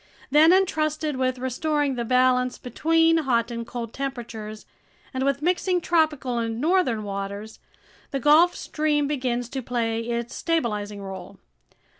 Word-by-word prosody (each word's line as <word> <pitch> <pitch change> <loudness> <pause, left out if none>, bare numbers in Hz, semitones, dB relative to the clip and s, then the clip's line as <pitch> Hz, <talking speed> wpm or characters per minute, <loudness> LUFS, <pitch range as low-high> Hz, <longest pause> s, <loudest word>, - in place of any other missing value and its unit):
Then, 310 +3 +7
entrusted 310 -5 +1
with 255 0 0
restoring 280 +3 -1
the 240 -2 -2
balance 250 +1 +2
between 325 +6 +2
hot 240 -6 +1
and 230 0 -5
cold 235 -2 -6
temperatures 230 -5 -6 0.5
and 260 0 -1
with 275 +1 0
mixing 360 +1 +1
tropical 305 -8 +1
and 230 0 -2
northern 295 - +1
waters, 200 +2 -6 0.5
the 275 - -2
Gulf 310 +6 +5
Stream 300 -2 0
begins 250 -4 -1
to 265 +1 -4
play 230 -2 -1
its 235 +1 -3
stabilizing 210 -11 -2
role. 190 -2 -8
255 Hz, 135 wpm, -24 LUFS, 230-310 Hz, 0.5 s, Then